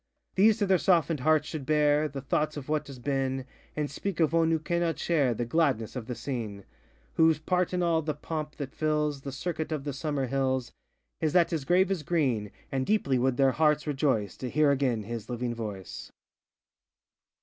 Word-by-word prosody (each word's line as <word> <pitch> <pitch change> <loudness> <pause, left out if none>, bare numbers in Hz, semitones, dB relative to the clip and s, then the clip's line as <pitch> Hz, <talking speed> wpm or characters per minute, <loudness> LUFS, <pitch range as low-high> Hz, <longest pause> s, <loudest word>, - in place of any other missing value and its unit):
These 210 +3 +5
to 205 - +1
their 190 -2 +3
softenŌĆÖd 165 -4 +2
hearts 155 +2 +2
should 155 -3 -5
bear 150 +1 +3
The 140 -2 -6
thoughts 150 +3 -1
of 140 - -7
what 150 0 -1
has 135 -2 -9
been, 135 0 -1 0.3
And 150 -1 -1
speak 180 +5 -4
of 160 -1 +3
one 165 -1 +3
who 165 - +3
cannot 170 +1 -1
share 140 -8 +1
The 120 - -2
gladness 130 -5 +1
of 120 -3 -5
the 125 - -4
scene; 110 -5 -5 0.5
Whose 160 -1 +5
part 180 +3 0
in 180 -1 0
all 165 -2 +2
the 150 -1 -3
pomp 150 0 -5
that 140 -1 -6
fills 150 -2 0
The 140 - -6
circuit 160 +3 -4
of 150 -3 -2
the 145 -1 -3
summer 145 -1 -2
hills, 130 -1 -1 0.5
IsŌĆöthat 165 +2 +3
his 155 -5 -2
grave 185 +3 +3
is 190 -5 0
green; 135 -11 0 0.2
And 135 -1 0
deeply 140 -9 +1
would 130 0 +1
their 135 -1 +4
hearts 150 +1 +2
rejoice 135 - 0
To 130 - -4
hear 150 +2 +3
again 130 -6 +1
his 115 +1 -6
living 120 0 -2
voice. 105 -5 -7
145 Hz, 195 wpm, -28 LUFS, 130-160 Hz, 0.5 s, These